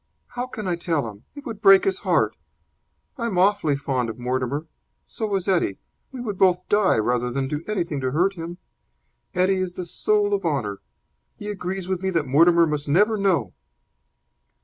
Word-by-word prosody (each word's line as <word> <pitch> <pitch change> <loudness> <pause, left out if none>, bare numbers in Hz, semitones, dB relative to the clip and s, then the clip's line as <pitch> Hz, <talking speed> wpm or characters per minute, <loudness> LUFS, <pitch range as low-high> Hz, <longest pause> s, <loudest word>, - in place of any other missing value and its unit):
"How 245 +1 -4
can 215 -5 -6
I 175 - +1
tell 165 -7 -1
him? 105 0 -11
It 285 0 -10
would 220 -5 -6
break 195 -2 +7
his 390 - 0
heart. - - +1 0.8
I 235 - -1
am 195 -6 -2
awfully 185 -5 +3
fond 130 -4 -2
of 110 - -6
Mortimer. 130 +4 -2 0.4
So 215 -3 -3
is 190 -1 -2
Eddie. 175 - +1 0.3
We 260 - -8
would 210 -6 -4
both 180 -1 +3
die 205 -2 +3
rather 120 +2 0
than 135 +2 -2
do 150 +3 -4
anything 170 -9 -2
to 130 - 0
hurt 175 +8 +1
him. 170 -1 -7 0.8
Eddie 185 +1 +2
is 180 -1 -4
the 180 - -5
soul 205 +3 +1
of 200 - 0
honour. 130 - -2 0.6
He 205 - -7
agrees 190 -1 -4
with 185 -1 -2
me 190 - 0
that 165 -5 0
Mortimer 170 +5 +5
must 150 -2 -3
never 205 +9 +3
know." 180 - +1
175 Hz, 185 wpm, -23 LUFS, 140-200 Hz, 0.8 s, break